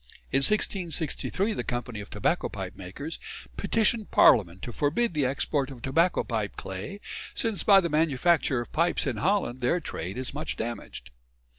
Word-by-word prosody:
In 135 Hz, -, +3 dB
1663 185 Hz, +3 st, 0 dB
the -, -, -3 dB
Company 120 Hz, -3 st, -4 dB
of 100 Hz, -, -10 dB
Tobacco -, -, 0 dB
Pipe -, -, -6 dB
Makers 100 Hz, -, -7 dB, 0.4 s
petitioned 225 Hz, -1 st, +1 dB
Parliament 90 Hz, -3 st, +5 dB
"to 120 Hz, -, -4 dB
forbid 165 Hz, -, +1 dB
the 145 Hz, -4 st, +2 dB
export 140 Hz, +1 st, 0 dB
of 125 Hz, -4 st, -11 dB
tobacco 165 Hz, +7 st, +2 dB
pipe 110 Hz, -4 st, -2 dB
clay, 95 Hz, -, -6 dB, 0.4 s
since 225 Hz, -4 st, 0 dB
by 200 Hz, -2 st, +7 dB
the 180 Hz, -, 0 dB
manufacture 155 Hz, -2 st, +2 dB
of 120 Hz, -, -9 dB
pipes 170 Hz, +2 st, +1 dB
in 130 Hz, -6 st, -1 dB
Holland 150 Hz, -, 0 dB
their 145 Hz, +9 st, +2 dB
trade 95 Hz, -, -5 dB
is 130 Hz, 0 st, -3 dB
much 150 Hz, +2 st, -3 dB
damaged." 110 Hz, -, -6 dB
140 Hz, 160 wpm, -27 LUFS, 120-175 Hz, 0.4 s, by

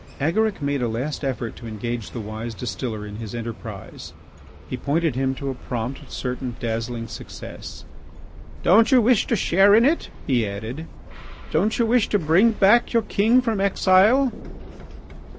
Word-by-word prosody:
Agaric 195 Hz, +5 st, 0 dB
made 140 Hz, -1 st, 0 dB
a 120 Hz, -, +1 dB
last 130 Hz, +8 st, -3 dB
effort 120 Hz, -4 st, -3 dB
to 115 Hz, -, -10 dB
engage 115 Hz, 0 st, -4 dB
the 120 Hz, -, -7 dB
wise 110 Hz, +2 st, -6 dB
distiller 115 Hz, -3 st, -4 dB
in 105 Hz, 0 st, -8 dB
his 110 Hz, -1 st, -7 dB
enterprise. 115 Hz, -1 st, -8 dB, 0.5 s
He -, -, -4 dB
pointed 150 Hz, +4 st, 0 dB
him 130 Hz, +1 st, -1 dB
to 140 Hz, 0 st, -4 dB
a -, -, -4 dB
prompt, 125 Hz, +3 st, -6 dB
certain, 125 Hz, -1 st, -4 dB
dazzling 115 Hz, 0 st, -3 dB
success. -, -, -9 dB, 0.8 s
"Don't 225 Hz, +7 st, +5 dB
you 260 Hz, -, +7 dB
wish 235 Hz, -1 st, +3 dB
to 235 Hz, -, +1 dB
share 195 Hz, +1 st, +4 dB
in 230 Hz, +2 st, +5 dB
it?" 315 Hz, +5 st, +1 dB, 0.2 s
he 120 Hz, -5 st, +1 dB
added. 110 Hz, +11 st, -6 dB, 0.6 s
"Don't 200 Hz, +8 st, +1 dB
you 235 Hz, -, +2 dB
wish 230 Hz, -1 st, +2 dB
to 205 Hz, -, +3 dB
bring 185 Hz, +7 st, +4 dB
back 215 Hz, +5 st, +4 dB
your 230 Hz, -1 st, +3 dB
king 220 Hz, +5 st, +3 dB
from 225 Hz, -5 st, -1 dB
exile?" 200 Hz, +7 st, +4 dB
140 Hz, 160 wpm, -23 LUFS, -, 0.8 s, you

